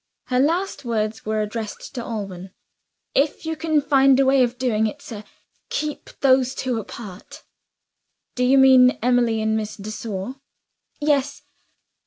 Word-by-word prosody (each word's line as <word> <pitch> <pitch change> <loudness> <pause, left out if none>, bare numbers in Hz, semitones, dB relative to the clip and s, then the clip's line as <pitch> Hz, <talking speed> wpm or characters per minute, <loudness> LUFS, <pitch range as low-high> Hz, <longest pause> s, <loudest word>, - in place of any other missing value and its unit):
Her 250 -1 +2
last 335 +8 0
words 220 -2 -2
were 215 0 0
addressed 215 0 -6
to 240 - -5
Alban. 195 -5 -6 0.6
"If 290 +3 0
you 320 0 -2
can 315 -1 +1
find 275 -2 +4
a 275 - +4
way 265 0 +4
of 245 0 +1
doing 225 -4 +1
it, 215 - -6
sir, 215 -2 -9 0.5
keep 305 -1 -4
those 260 -1 +3
two 250 -3 -2
apart." 205 -2 -10 0.9
"Do 250 - -1
you 260 +2 +4
mean 260 -1 +6
Emily 240 -3 +2
and 220 0 +1
Miss 215 -1 -3
de 215 0 -7
Sor? 215 +3 -5 0.6
"Yes." 290 -2 0
250 Hz, 150 wpm, -22 LUFS, 215-270 Hz, 0.9 s, mean